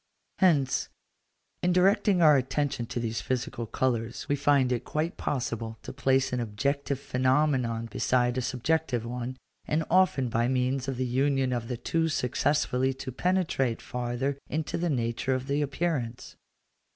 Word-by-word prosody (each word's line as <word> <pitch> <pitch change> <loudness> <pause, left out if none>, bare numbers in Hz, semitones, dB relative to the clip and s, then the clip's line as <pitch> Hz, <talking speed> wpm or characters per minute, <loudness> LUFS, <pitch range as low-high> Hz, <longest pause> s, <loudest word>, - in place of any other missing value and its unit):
Hence, 150 -9 +3 0.7
in 180 0 +2
directing 195 0 +4
our 150 -2 +8
attention 135 -1 -1
to 120 - -3
these 115 -3 -2
physical 120 -1 -3
colours, 120 -1 -1
we 145 - +2
find 140 -2 +3
it 120 - 0
quite 155 +3 -2
possible 115 -4 -3
to - - -7
place 130 -1 +1
an 125 - 0
objective 135 +5 -1
phenomenon 130 -3 +1
beside 125 +1 +1
a 130 - 0
subjective 130 0 0
one, 125 +2 -4 0.3
and 155 +2 0
often 180 -8 +3
by 115 +1 +1
means 130 +1 0
of 135 -2 -2
the 130 - 0
union 135 +1 +1
of 120 -2 -3
the 125 - -3
two 165 +7 0
successfully 130 -1 +1
to 130 - -6
penetrate 165 -6 0
farther 125 +3 -3
into 155 0 -2
the 175 0 0
nature 120 0 0
of 130 0 -3
the 140 +1 0
appearance. 140 -5 -2
130 Hz, 150 wpm, -28 LUFS, 120-145 Hz, 0.7 s, our